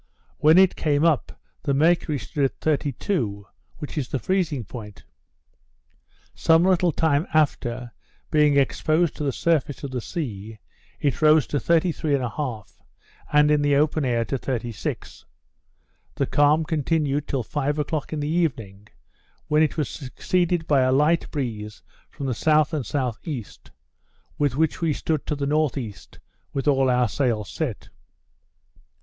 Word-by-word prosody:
When 155 +3 +6
it 190 -1 +5
came 150 0 +1
up, 160 -5 0 0.2
the 140 -2 0
mercury 160 0 +2
stood 140 +1 -1
at 135 - -3
32, 140 - -1 0.3
which 150 +1 -5
is 130 - -4
the - - -1
freezing 170 -5 -1
point. 105 -1 -10 1.3
Some 165 +1 +4
little 180 -2 +3
time 155 +1 +1
after, 125 -5 0 0.4
being 150 -2 +4
exposed 155 +4 +1
to - - -3
the 140 - 0
surface 150 -1 0
of 140 - -5
the 125 -2 -3
sea, 110 - -5 0.4
it 140 -1 -1
rose 155 -2 +5
to 145 - -2
33 165 -3 +1
1/2, 125 -3 -4 0.5
and 150 0 +5
in 150 -1 +3
the 145 -1 +2
open 150 +1 +2
air 120 -3 0
to 135 - -3
36. 120 -5 -5 0.9
The - - 0
calm 145 +2 +3
continued 150 -2 -1
till 135 -3 -1
five 145 +4 -2
o'clock 150 0 -2
in 155 -2 -3
the 145 - -2
evening, 115 - -2 0.6
when 150 +1 +4
it 155 0 +1
was 150 - 0
succeeded 170 +4 -1
by 145 -4 +3
a 130 0 +2
light 150 +5 +2
breeze 110 -7 -5 0.3
from 140 - -7
the 130 - -1
S. 155 +5 +2
and 150 -4 -1
S.E., 130 - -3 0.9
with 145 -4 +1
which 160 +2 0
we 165 -2 +1
stood 155 0 -2
to 150 - -1
the 140 -1 -3
N.E. 140 -6 0 0.6
with 135 +1 -2
all 135 -2 +3
our 125 -1 +3
sails 115 -3 -1
set. 145 -9 -4
145 Hz, 150 wpm, -24 LUFS, 130-155 Hz, 1.3 s, When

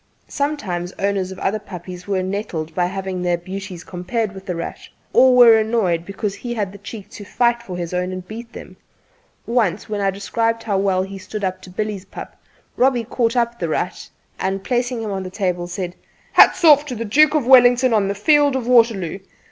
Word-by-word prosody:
Sometimes 205 -12 -3
owners 195 -2 -1
of 190 - -8
other 205 +3 -1
puppies 180 -2 -9
were 190 -2 0
nettled 185 -5 -4
by 175 +1 +1
having 190 -1 -4
their 175 -1 +1
beauties 185 0 -7
compared 190 +4 -3
with 190 0 -12
"The 180 - -2
Rat," 170 - -5 0.3
or 260 -1 +6
were 235 -3 +8
annoyed 210 -7 0
because 200 0 -3
he 240 +2 -6
had 205 -4 -2
the 200 - -12
cheek 205 0 -9
to 220 -3 -9
fight 235 +3 +1
for 185 -6 -7
his 175 0 -5
own 180 +1 -1
and 185 -1 -7
beat 230 +3 -8
them. - - -11 0.7
Once, 220 -6 0
when 210 -1 -2
I - - 0
had 195 -1 0
described 225 +3 -1
how 200 -3 0
well 190 -1 +1
he 195 +1 -7
had - - -11
stood 215 -1 -6
up 185 0 -2
to 185 - -12
Billy's 205 0 -4
pup, - - -10 0.4
Robbie 250 -2 +3
caught 230 +1 -1
up 235 -1 0
"The 170 - -2
Rat," - - -3 0.3
and 195 0 -2
placing 245 -1 -1
him 215 - -4
on 195 -1 -3
the 185 - -6
table, 180 -3 -2
said: 180 0 -5 0.4
"Hats - - +6
off 295 -3 +7
to 255 - -4
the 230 +1 -4
Duke 300 +7 +4
of 295 -5 +1
Wellington 250 -1 +6
on 205 -3 +2
the 200 - -2
field 290 +5 +3
of 260 -3 -2
Waterloo." 225 -8 +3
200 Hz, 210 wpm, -20 LUFS, 185-235 Hz, 0.7 s, were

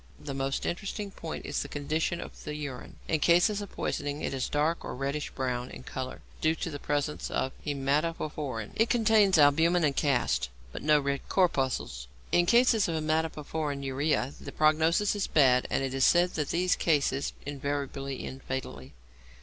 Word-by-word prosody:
The 150 -2 -6
most 135 0 -2
interesting 200 +3 -3
point 165 -4 -7
is - - -2
the - - -4
condition 155 +4 -1
of - - -9
the 150 -1 -5
urine. 140 -4 -6
In 160 - +1
cases 175 +6 +4
of 200 - -7
poisoning 145 0 -3
it - - -2
is 130 -2 -2
dark 155 +3 0
or - - -5
reddish 140 +3 -2
brown 125 -2 -3
in - - -10
colour, 130 0 -6 0.2
due 160 +1 +3
to 165 - -4
the 145 - -6
presence 145 +1 -2
of 130 - -1 0.2
hæmatoporphyrin. 145 -4 -1
It 225 +1 +3
contains 215 -5 +4
albumin 160 +4 +5
and 145 -3 +2
casts, 120 - +1 0.2
but - - -7
no 150 0 +4
red 140 -1 -3
corpuscles. 130 - 0 0.2
In 175 0 +3
cases 235 -1 +5
of 165 - -1
hæmatoporphyrinuria 150 -3 -1
the - - -7
prognosis 160 +7 +3
is 205 - -1
bad, 130 -4 +4
and - - 0
it 135 -1 -2
is 135 -1 +1
said 175 +4 +5
that 150 -3 -2
these 180 +2 +2
cases 140 -4 +1
invariably 140 -1 -3
end 135 +1 -7
fatally. 75 - -6
150 Hz, 170 wpm, -29 LUFS, 135-165 Hz, 0.2 s, albumin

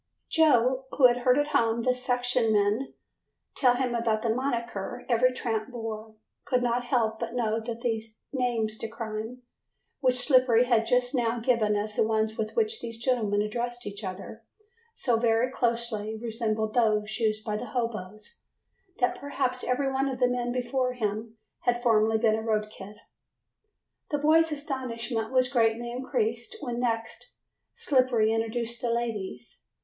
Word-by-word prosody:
Joe, 260 -5 +3
who 270 - +5
had 245 -1 +6
heard 250 +1 +3
at 290 0 +1
home 230 -5 +1
the 255 - +3
section 250 -2 +1
men 210 +5 +1 0.6
tell 250 -3 +4
about 235 -4 0
the 230 - 0
"monicker" 235 -2 -3
every 250 +1 +3
tramp 225 -3 -2
bore, 225 -2 -6 0.3
could 250 -2 0
not 245 0 0
help 225 -3 0
but 235 0 -4
note 225 -2 -1
that 235 -1 -5
these 225 -2 -3
"names 230 -4 -1
de 225 - -3
crime" 225 +2 -6 0.6
which 255 -3 +2
Slippery 250 -2 +5
had 230 -2 +2
just 250 +1 +2
now 240 -2 0
given 230 -3 +2
as 210 +1 -2
the 220 - +2
ones 220 0 0
with 215 -1 -4
which 445 -1 +1
these 230 -1 -5
gentlemen 225 -4 +1
addressed 240 +3 -3
each 205 +1 -6
other, 195 +4 -7 0.5
so 240 -3 +1
very 230 +2 +2
closely 230 -3 -1
resembled 220 -1 -2
those 215 -2 +1
used 215 -1 0
by 210 - -2
the 240 - -4
hoboes 215 - -5 0.6
that 245 - 0
perhaps 260 -3 -2
every 270 +2 0
one 270 +1 0
of 260 - -4
the 250 - +4
men 245 -1 -1
before 250 +1 -1
him 220 -1 -3 0.2
had 240 0 0
formerly 220 -1 +3
been 220 -1 +3
a 220 - -1
road 215 -1 -1
kid. 205 0 -11 1.1
The 295 - 0
boy's 320 +2 +4
astonishment 245 -6 -3
was 255 -1 +3
greatly 235 -2 +1
increased 240 - -2
when 240 -3 -4
next 230 - -3 0.4
Slippery 250 -5 +2
introduced 230 +1 -2
the 240 - -1
"ladies". 215 - -3
235 Hz, 155 wpm, -27 LUFS, 220-250 Hz, 1.1 s, had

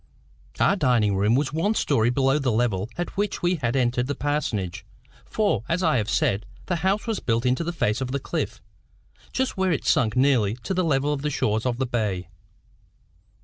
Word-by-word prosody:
Our 200 - +4
dining 120 - +2
room 105 +4 +3
was 135 +1 0
one 200 +8 +1
story 120 - +2
below 135 +3 +2
the 135 -4 0
level 110 -3 0
at 175 - -4
which 205 -2 -1
we 175 0 +2
had 120 -4 -1
entered 125 -1 +1
the 145 - -2
parsonage; 115 - -2 0.4
for, 200 - 0
as 180 +3 0
I 155 -5 +3
have 110 -1 -1
said, 105 -1 0 0.2
the 180 - -1
house 190 +5 0
was 225 -3 -1
built 115 +1 0
into 125 +6 +1
the 170 - -2
face 115 -8 0
of 130 - -2
the 140 - -1
cliff, - - -4 0.7
just 260 -4 -1
where 190 -1 +1
it 150 - -1
sunk 110 -3 +2
nearly 125 -6 +3
to 190 - -2
the 185 0 +1
level 145 -2 +1
of 140 - -3
the 150 - -1
shores 110 -4 0
of 120 -1 -1
the 130 - 0
bay. 105 -8 -2
130 Hz, 200 wpm, -24 LUFS, 115-165 Hz, 0.7 s, Our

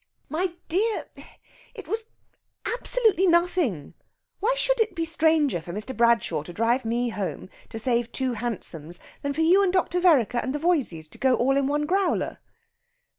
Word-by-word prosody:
"My 335 +4 -1
dear 415 +7 0 0.7
it 420 -9 -10
was 440 +5 -3 0.6
absolutely 455 -6 +2
nothing! 340 - +1 0.5
Why 470 +6 +1
should - - +2
it 440 -4 +1
be 330 - -1
stranger 315 - +2
for 170 - -8
Mr. 215 +6 -5
Bradshaw 235 -9 +2
to 155 - -10
drive 230 +6 +1
me 240 +2 0
home 200 -3 -5 0.2
to - - -7
save 235 0 0
two 260 -2 0
hansoms 180 -8 -4 0.2
than 285 -1 -2
for 315 - -2
you 355 +5 +5
and 385 -2 +2
Dr. 360 -1 +1
Vereker 275 - +3
and 260 +3 -3
the - - -2
Voyseys 275 - 0
to - - -14
go 260 -1 +3
all 270 +3 +2
in 275 -1 +1
one 295 +1 0
growler?" 380 +4 0
285 Hz, 170 wpm, -25 LUFS, 235-360 Hz, 0.7 s, you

